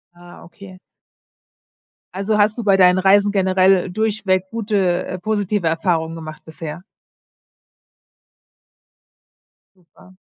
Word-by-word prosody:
Ah, 175 0 -15
okay. 185 +1 -14 1.4
Also 200 +3 -1
hast 210 +3 +1
du - - -3
bei 200 -2 +3
deinen 185 0 +4
Reisen 200 +2 +3
generell 190 -1 +2
durchweg 200 -2 -1
gute, 200 -6 -1
äh, 185 - -5
positive 205 0 -2
Erfahrungen 165 0 -1
gemacht 155 -1 -10
bisher? 160 +1 -9 2.9
Super. 185 +1 -22
185 Hz, 100 wpm, -19 LUFS, 175-205 Hz, 2.9 s, deinen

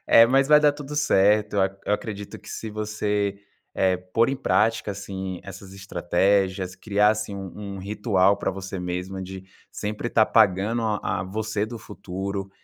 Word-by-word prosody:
eh, 115 - +8
mas 135 +2 +3
vai 150 0 +7
dar 150 -1 +5
tudo 145 0 -8
certo, 105 -6 +3 0.3
eu 105 - +1
acredito 105 -2 -6
que - - -15
se 110 - -5
você, 105 -1 -2 0.4
eh, 95 -1 +2
pôr 95 +7 +1
em 135 - -2
prática 105 0 +1
assim 95 -2 -6
essas 95 0 -10
estratégias, 95 0 0
criasse 105 0 +1
um 100 +1 -7
um - - -7
ritual 100 -1 +2
pra - - -1
você 95 0 -6
mesma 90 +2 -4
de 95 0 -8 0.3
sempre 105 +3 -3
estar 110 -2 +4
pagando 110 +2 +3
a 105 -3 -1
a - - -4
você 110 +2 -2
do 115 0 -7
futuro, 100 -2 -5
100 Hz, 160 wpm, -24 LUFS, 95-110 Hz, 0.4 s, eh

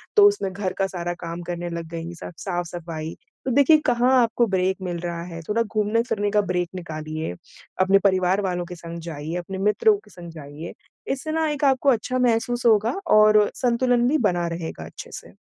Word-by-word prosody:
तो 410 -1 +8
उसमें 405 - 0
घर 190 -1 -3
का 195 - +2
सारा 175 -2 -4
काम 170 0 -5
करने 175 0 -3
लग 170 -1 -5
गईं 165 +1 -5
सब - - -8
साफ-सफाई। 170 -3 -4 0.3
तो 260 - 0
देखिए 285 +5 +6
कहाँ 245 +2 +3
आपको 235 0 +2
ब्रेक 190 -1 +1
मिल 175 -2 -3
रहा 170 -1 -3
है, 165 - -6
थोड़ा 230 +2 +2
घूमने-फिरने 215 0 0
का 210 -1 +4
ब्रेक 180 -3 -1
निकालिए, 155 - -5 0.5
अपने 195 +1 +5
परिवार 190 0 +3
वालों 180 -2 -2
के 180 - -8
संग 170 0 -8
जाइए, 155 +2 -5
अपने 190 +2 -5
मित्रों 210 - +3
के - - -19
संग 170 -1 -10
जाइए, 155 +1 -9 0.4
इससे 280 +4 -3
ना 320 0 +1
एक 295 0 -1
आपको 270 +1 +3
अच्छा 255 +1 +1
महसूस 240 0 +1
होगा 225 - +3 0.2
और 215 -1 +6
संतुलन 245 0 +2
भी 305 +4 +3
बना 175 -1 -1
रहेगा 165 - -5
अच्छे 80 - -10
से। - - -9
190 Hz, 190 wpm, -23 LUFS, 170-235 Hz, 0.5 s, तो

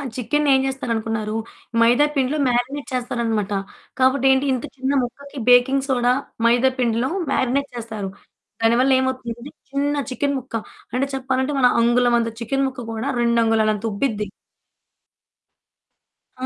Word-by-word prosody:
చికెనేం 275 +2 +2
చేస్తారు 265 -2 -3
అనుకున్నారు 220 -1 -2 0.4
మైదా 245 +6 +5
పిండిలో 275 +3 +1
మారినేట్ 255 +4 -1
చేస్తారన్నమాట. 230 -5 -1 0.5
కాబట్టి 260 +1 +3
ఏంటి 265 +1 +2
ఇంత 250 - -3
చిన్న 265 +1 -1
ముక్కకి 280 +3 -8
బేకింగ్ 265 +2 +5
సోడా 245 -1 +2 0.3
మైదా 245 +3 +4
పిండిలో 235 +1 +1 0.2
మారినేట్ 275 +3 0
చేస్తారు. 220 -4 -5 0.5
దాని 225 +1 +4
వల్ల 270 - +3
ఏమవుతుంది 260 -3 -2
అంటే 280 - -9 0.2
చిన్న 285 +1 0
చికెన్ 280 +2 -1
ముక్క 250 -2 -9 0.4
అంటే 260 +2 +1
చెప్పాలంటే 265 +1 -1
మన 250 - +6
అంగుళం 240 +1 +3
అంత 230 0 -1
చికెన్ 270 +4 0
ముక్క 260 -1 -7
కూడా 225 +5 -3
2 235 0 +2
అంగుళాల 225 -1 +2
అంత 210 +2 -6
ఉబ్బిద్ది. 210 -1 -1 2.1
ఆ! 260 - -1
250 Hz, 140 wpm, -21 LUFS, 230-270 Hz, 2.1 s, మన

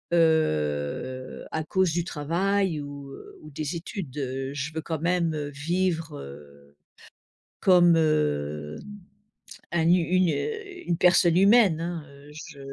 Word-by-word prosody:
heu, 130 - 0
à 160 0 -2
cause 185 +1 +1
du 175 -1 0
travail 175 +2 0
ou, 140 -1 -9
heu, - - -12
ou 155 - -11
des 150 +3 -4
études. 165 - -6
Heu, 135 0 -3
je 145 +3 -4
veux 160 - -3
quand 160 -2 -4
même, 170 -1 0
heu, 145 -1 -3
vivre, 165 +1 -2
heu, 70 0 -13 0.8
comme, 175 -2 +5
hem, 75 - 0 0.9
un 170 -2 +1
hu - - +7
une, 180 +1 +2
heu, 405 -5 -4
une 170 -1 +1
personne 175 -1 +4
humaine 200 -4 +5
hein, 170 -1 -4
heu, 140 +1 -16
je 150 -1 -10
160 Hz, 140 wpm, -26 LUFS, 140-175 Hz, 0.9 s, hu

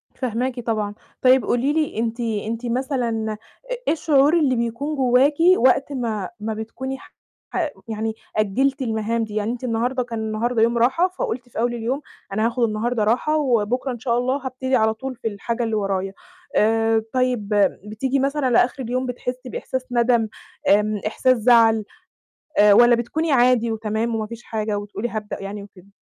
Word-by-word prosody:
فاهماكِ 250 0 -2
طبعًا. 215 -3 -2 0.3
طيب 255 0 +5
قولي 260 +4 +1
لي 310 -7 -1
أنتِ 230 +1 -2
أنتِ 225 +1 -3
مثلًا 240 -3 -1 0.4
إ - - +1
إيه - - +4
الشعور 300 -2 +3
اللي 270 -4 +2
بيكون 235 +6 -2
جواكِ 260 +2 +4 0.2
وقت 260 +3 +3
ما 225 -7 -2
ما 220 +1 -3
بتكوني 240 +5 -5
ح - - -17 0.7
يعني 220 0 -2 0.2
أجّلتِ 265 +7 +1
المهام 225 -1 -1
دي، 215 -1 -7
يعني 215 +1 0
أنتِ 245 +1 -6
النهارده 245 +2 0
كان 230 -2 -5
النهارده 220 +2 -1
يوم 235 +1 +3
راحة، 260 +10 +3
فقلتِ 250 -9 -4
في - - -6
أول 240 +1 +1
اليوم 240 +4 -2 0.3
أنا 215 +2 +1
هاخد 240 +1 -1
النهارده 225 +1 0
راحة 245 +8 +2
وبُكرة 250 -2 0
إن 240 - -6
شاء 235 -1 0
الله 260 +2 -1
هابتدي 260 0 -1
على 220 -2 +3
طول 260 +4 -6
في 230 - -5
الحاجة 230 +3 -3
اللي 225 -1 -1
ورايا. 195 -2 -1 0.4
آآ، 225 +1 +3
طيب 250 -5 0 0.4
بتيجي 255 +6 -1
مثلًا 275 0 0
لآخر 245 +2 +2
اليوم 255 +2 -2
بتحسّي 250 +1 -5
بإحساس 260 +1 -4
نَدَم، 235 -2 +2 0.4
آمم 210 +1 +3
إحساس 255 +3 +2
زَعَل 225 -2 +4 0.7
آآ، 205 0 +7
والَّا 240 +3 +7
بتكوني 305 +7 -1
عادي 245 -3 +4
وتمام 220 +1 -2
وما 215 -1 -2
فيش 230 +1 -9
حاجة 215 -2 -2
وتقولي 205 +3 -4
هابدأ 215 -3 -5
يعني 200 +1 -6
وكده؟ 195 -2 -16
235 Hz, 170 wpm, -22 LUFS, 220-255 Hz, 0.7 s, آآ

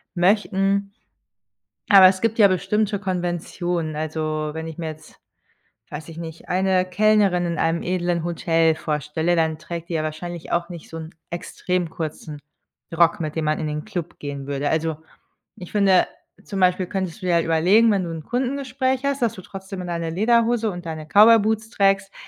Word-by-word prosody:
möchten. 195 +1 +1 1.0
Aber, 195 -2 +9
es 185 0 0
gibt 230 0 0
ja 205 - +8
bestimmte 205 +3 0
Konventionen, 175 -3 -2
also 155 0 -2
wenn 160 0 -5
ich 160 - -9
mir 165 -2 -3
jetzt, 155 0 -13 0.7
weiß 155 - -7
ich 160 - -11
nicht, 165 -1 -9
eine 185 0 +2
Kellnerin 200 -2 +3
in 170 - -3
einem 165 +1 +1
edlen 175 -2 -1
Hotel 165 -1 +2
vorstelle, 155 +2 -1
dann 160 -1 +1
trägt 170 0 -7
die 170 - -2
ja 155 - 0
wahrscheinlich 170 +2 -6
auch 170 +1 0
nicht 170 -2 -9
so 165 - -8
'n 160 +1 -9 0.2
extrem 175 0 -3
kurzen 155 -2 -6 0.6
Rock, 175 +3 +4
mit 155 0 -4
dem 160 - -1
man 155 - +1
in 155 - -2
den 150 0 -4
Club 180 -7 -6
gehen 140 -1 -6
würde. 140 0 -2
Also, 160 -1 0 0.6
ich 180 - -10
finde 195 -3 +4 0.4
zum 195 -2 -4
Beispiel 185 0 +3
könntest 190 0 -4
du - - -6
dir 175 - +2
halt 165 - +3
überlegen, 185 +8 +4
wenn 195 -3 +1
du 165 - -5
'n 160 -2 -6
Kundengespräch 260 - -1
hast, 280 -1 -1
dass 230 -3 +1
du 185 - -10
trotzdem 190 -1 -8
deine 170 -1 -3
Lederhose 230 +3 +2
und 175 -1 -8
deine 155 -1 -5
Cowboy 215 +7 +7
Boots 220 +1 -1
trägst, 195 -2 +1
175 Hz, 180 wpm, -22 LUFS, 160-200 Hz, 1.0 s, Aber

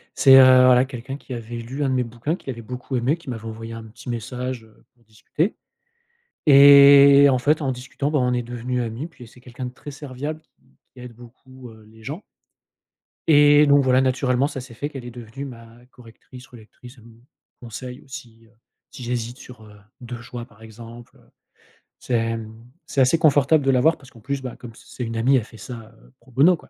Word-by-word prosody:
C'est, 135 -1 +7
heu, 130 - +9 0.2
voilà, 125 0 +5
quelqu'un 135 +1 -8
qui 130 - -10
avait 120 0 -7
lu 125 +5 -5
1 135 - 0
de 130 - 0
mes 125 - +1
bouquins 120 +8 -4
qui - - -20
l'avait 115 -2 -6
beaucoup 125 +3 -7
aimé 130 +7 0
qui 155 -5 -13
m'avait 115 -2 -7
envoyé 115 0 -8
un 115 - -8
petit 110 +3 -12
message, 125 +1 -5
heu, 110 -1 -23
pour 120 -1 -32
discuter 130 - -3 0.9
et 140 0 +8
en 130 - +2
fait, 150 +4 +1
en 135 - -1
discutant, 130 +3 -4
bah, 150 - +1
on 125 -1 0
est 125 0 -1
devenu 120 +1 -4
ami 115 +5 -5
et - - -5
puis 125 -8 -15
c'est 125 - -19
quelqu'un 125 0 -8
de 125 - -8
très 145 +2 -11
serviable 145 +2 -7
qui - - -42 0.3
qui 125 - -14
aide 125 -1 -11
beaucoup, 125 +1 -15
heu, 110 -1 -17
les 110 0 -19
gens 150 - -7 1.0
et 145 -1 +6
donc 145 0 +4
voilà, 130 0 +3
naturellement, 130 +1 0
ça 135 - -7
s'est 125 -2 -12
fait 145 +5 -5
qu'elle 135 -4 -9
est 120 - -8
devenue 120 +3 -9
ma 115 -4 -11 0.2
correctrice 125 +1 -16
relectrice, 120 +2 -16
elle 115 - -18
me 115 0 -18 0.4
conseille 125 +2 -9
aussi, 120 -4 -12
heu, 110 - -27 0.4
si 125 - -10
j'hésite 120 0 -4
sur, 125 -3 -14
heu, 105 -1 -16 0.2
2 120 -1 -8
choix 120 0 -8
par 110 -2 -22
exemple, 115 +2 -13
heu, - - -25 0.7
c'est, 125 - -6
hem, 115 -1 -2 0.3
c'est 135 - -1
assez 130 +6 +3
confortable 145 -1 +3
de 135 - +3
l'avoir 135 +5 +2
parce 135 -2 -18
qu'en 115 - -17
plus, 135 +3 -5
bah, 125 - -7
comme 115 -2 -12
c'est - - -18
c'est 125 - -3
une 115 0 -5
amie, 130 +4 +3
elle 115 - -1
fait 115 - -15
ça, 115 -2 -10 0.3
pro 125 +2 -22
bono 150 +9 +4
quoi - - -20
125 Hz, 220 wpm, -22 LUFS, 115-135 Hz, 1.0 s, heu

